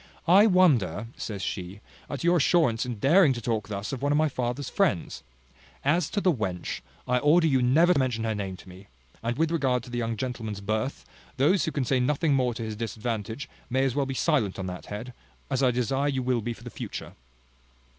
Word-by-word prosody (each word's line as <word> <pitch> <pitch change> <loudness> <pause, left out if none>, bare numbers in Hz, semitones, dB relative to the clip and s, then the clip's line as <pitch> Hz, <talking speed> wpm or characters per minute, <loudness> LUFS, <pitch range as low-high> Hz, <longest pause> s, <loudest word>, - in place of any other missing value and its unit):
"I 195 +5 +7
wonder," 120 - +3
says 100 -3 -5
she, 95 +2 -4 0.3
"at 140 - -4
your 175 +1 +4
assurance 135 -7 +2
in 120 - -3
daring 145 - +5
to 120 - -5
talk 110 -3 -2
thus 100 +3 -4
of 130 - -4
one 145 +1 +1
of 145 - +3
my 155 0 +3
father's 125 +1 -3
friends. 165 - 0 0.6
As 155 +2 +2
to 210 - -1
the 185 -3 +3
wench, 95 - -3 0.3
I 125 0 +2
order 155 +5 +4
you 135 -5 +3
never 160 +9 +5
to 145 - +1
mention 125 -4 0
her 110 -1 0
name 95 -3 -4
to - - -15
me. 95 +2 -13 0.3
And 120 +2 -2
with 160 +1 +1
regard 130 -7 +1
to 125 - -11
the 120 - -2
young 115 -1 -2
gentleman's 115 -4 -4
birth, 110 +6 -2 0.3
those 150 +9 +3
who 160 - -2
can 140 -4 -1
say 130 +1 +2
nothing 145 +4 +1
more 125 -3 +1
to 115 - -4
his 110 -1 -4
disadvantage, 115 +3 -4 0.2
may 130 +2 +1
as 130 - 0
well 140 0 0
be 135 - -4
silent 130 - +1
on 95 - -4
that 90 -1 -7
head, 115 +5 -6 0.4
as 135 0 +1
I 130 - +4
desire 130 +4 0
you 130 -2 -1
will 125 -2 +1
be 120 +2 -3
for - - -15
the - - -8
future." - - -7
125 Hz, 220 wpm, -27 LUFS, 110-145 Hz, 0.6 s, I